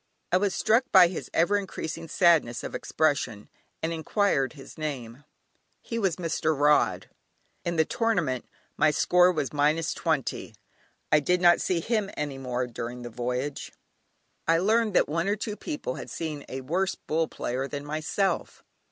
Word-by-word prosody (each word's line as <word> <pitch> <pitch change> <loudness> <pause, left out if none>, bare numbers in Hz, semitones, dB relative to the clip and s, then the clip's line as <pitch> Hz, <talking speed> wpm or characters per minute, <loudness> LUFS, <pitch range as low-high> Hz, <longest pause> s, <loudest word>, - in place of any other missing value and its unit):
I 180 - +5
was 195 0 0
struck 235 +4 +2
by 180 -2 +8
his 180 - -6
ever 175 +5 +3
increasing 165 -4 -5
sadness 165 -9 +3
of - - -6
expression, 140 -9 -1 0.3
and 165 +1 0
enquired 160 - +1
his 140 -3 -12
name. 140 -4 -5 0.5
He 230 - -4
was 195 -6 +1
Mr. 160 -3 -1
Rod. 150 0 +3 0.6
In 170 - -2
the 160 -1 +3
tournament 175 - 0 0.3
my - - +4
score 180 +4 +4
was 155 -5 -2
minus 150 +3 +1
twenty; - - -2 0.6
I 150 - +6
did 180 +5 +1
not 175 -1 +5
see 175 -3 0
him 215 0 0
any 145 -2 -3
more 125 -1 -2
during 120 +1 -6
the 120 - -7
voyage! 125 +4 -3 0.7
I 165 0 +5
learned 215 +3 +2
that - - +4
one 165 +4 -1
or 205 - +2
two 210 0 -4
people 320 - -4
had - - -7
seen 155 -3 -5
a 130 - -5
worse 180 +8 -1
"Bull" 160 +1 -1
player 130 +3 -3
than 145 0 -6
myself. 155 +5 -2
160 Hz, 160 wpm, -27 LUFS, 140-185 Hz, 0.7 s, by